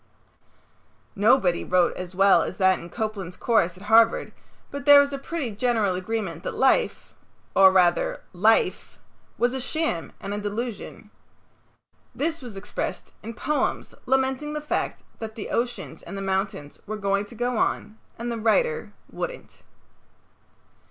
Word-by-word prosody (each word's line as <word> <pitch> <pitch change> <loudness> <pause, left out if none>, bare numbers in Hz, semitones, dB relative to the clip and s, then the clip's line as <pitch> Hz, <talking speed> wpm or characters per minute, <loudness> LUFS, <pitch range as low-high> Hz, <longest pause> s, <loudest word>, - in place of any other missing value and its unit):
Nobody 200 -4 +3
wrote 180 -1 +2
as 180 0 -7
well 195 +1 +5
as - - -4
that 190 -1 +3
in 170 - -10
Copeland's 205 -4 -4
course 185 -7 +1
at 190 - -13
Harvard 225 +2 +4 0.4
but 280 -1 -6
there 290 -1 +9
was 285 0 +2
a 275 - -3
pretty 280 -4 -4
general 215 -2 +1
agreement 185 -3 -3
that - - -5
life 265 - +1 0.4
or 190 -1 +8
rather 180 -2 +2
Life 215 +5 +2 0.4
was 245 +1 +1
a 265 - -2
sham 310 - -1
and 200 - -5
a 205 - -2
delusion. 210 +2 -5 1.0
This 325 +2 -1
was 235 -6 -9
expressed 195 - -5
in 230 +1 -7
poems 300 +6 -1
lamenting 265 +3 0
the 300 - -2
fact 300 - -3 0.2
that 220 -1 -6
the 215 - -6
oceans 240 +1 -3
and 195 - -8
the - - -4
mountains 190 -6 -3
were 215 +1 -4
going 200 0 0
to 235 - -13
go 245 0 -1
on 215 +1 -1 0.2
and 235 +1 -4
that 230 - -3
the - - -6
writer 470 - +1 0.2
wouldn't. - - -7
220 Hz, 150 wpm, -25 LUFS, 195-255 Hz, 1.0 s, there